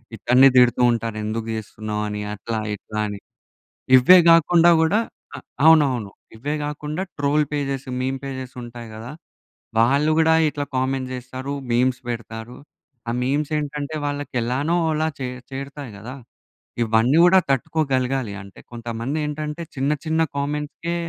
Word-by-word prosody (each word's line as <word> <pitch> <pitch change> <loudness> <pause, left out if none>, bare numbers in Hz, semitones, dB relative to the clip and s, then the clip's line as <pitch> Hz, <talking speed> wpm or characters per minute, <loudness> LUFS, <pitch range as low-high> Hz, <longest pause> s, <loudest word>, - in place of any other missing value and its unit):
ఇతని 125 +5 +5
తిడుతూ 125 0 +5
ఉంటారు 115 -1 -3
ఎందుకు 110 +1 -3
చేస్తున్నావు 110 0 -5
అని 105 0 -4
అట్లా, 110 +2 -4 0.2
ఇట్లా 110 +1 -7
అని. 105 -1 -6 0.8
ఇవే 180 +9 +8
కాకుండా 165 +1 +6
కూడా 185 +7 +3 0.7
అవునవును 135 -10 +4 0.3
ఇవే 145 +6 -3
కాకుండా 150 +3 -4 0.2
ట్రోల్ 145 +1 +2
పేజెస్, 140 -2 -2
మీమ్ 130 +1 -2
పేజెస్ 130 -2 -6
ఉంటాయి 120 -1 -9
కదా! 115 +4 -8 0.7
వాళ్ళు 140 +7 +3
కూడా 160 0 +4 0.2
ఇట్లా 145 -1 -4
కామెంట్స్ 130 0 -1
చేస్తారు 130 +2 -6 0.2
మీమ్స్ 125 +1 +2
పెడతారు. 115 0 -6 0.5
ఆ - - 0
మీమ్స్ 145 +4 -1
ఏంటంటే 150 +1 -4
వాళ్ళకి 145 0 -4
ఎలానో 135 +8 0 0.2
అలా 155 +1 0
చే 130 - -3 0.2
చేరుతాయి 140 -1 -7
కదా! 120 +6 -8 0.7
ఇవన్నీ 115 +5 +3
కూడా 190 +2 +6
తట్టుకోగలగాలి 135 -5 0
అంటే 100 -1 -14
కొంతమంది 115 +4 -4
ఏంటంటే 150 +2 -4
చిన్న, 135 +2 0
చిన్న 160 +1 +1 0.2
కామెంట్స్‌కే 150 +4 -3
135 Hz, 130 wpm, -22 LUFS, 115-150 Hz, 0.8 s, ఇవే